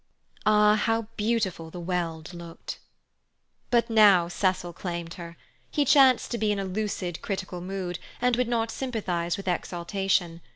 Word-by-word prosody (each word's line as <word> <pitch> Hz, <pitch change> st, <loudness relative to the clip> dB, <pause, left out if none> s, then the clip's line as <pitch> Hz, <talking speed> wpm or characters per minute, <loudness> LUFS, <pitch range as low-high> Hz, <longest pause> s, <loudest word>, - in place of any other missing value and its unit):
Ah, 210 Hz, 0 st, +6 dB
how 225 Hz, +2 st, +1 dB
beautiful 210 Hz, -7 st, -1 dB
the 175 Hz, -, -8 dB
Weald 170 Hz, -2 st, -3 dB
looked! 170 Hz, -1 st, -8 dB, 0.9 s
But 235 Hz, -1 st, +3 dB
now 205 Hz, -6 st, +6 dB
Cecil 180 Hz, -1 st, -1 dB
claimed 170 Hz, -1 st, -5 dB
her. 170 Hz, -2 st, -9 dB, 0.3 s
He 290 Hz, -, +1 dB
chanced 265 Hz, -3 st, +5 dB
to 235 Hz, -, -2 dB
be 215 Hz, 0 st, +2 dB
in 205 Hz, -, 0 dB
a 195 Hz, -, -2 dB
lucid 190 Hz, -3 st, -3 dB
critical 190 Hz, -3 st, -4 dB
mood, 180 Hz, -1 st, -4 dB, 0.2 s
and 250 Hz, 0 st, +2 dB
would 250 Hz, 0 st, +1 dB
not 230 Hz, -1 st, 0 dB
sympathize 185 Hz, -10 st, -2 dB
with 195 Hz, -, -8 dB
exaltation. 175 Hz, 0 st, -1 dB
190 Hz, 150 wpm, -27 LUFS, 175-220 Hz, 0.9 s, Ah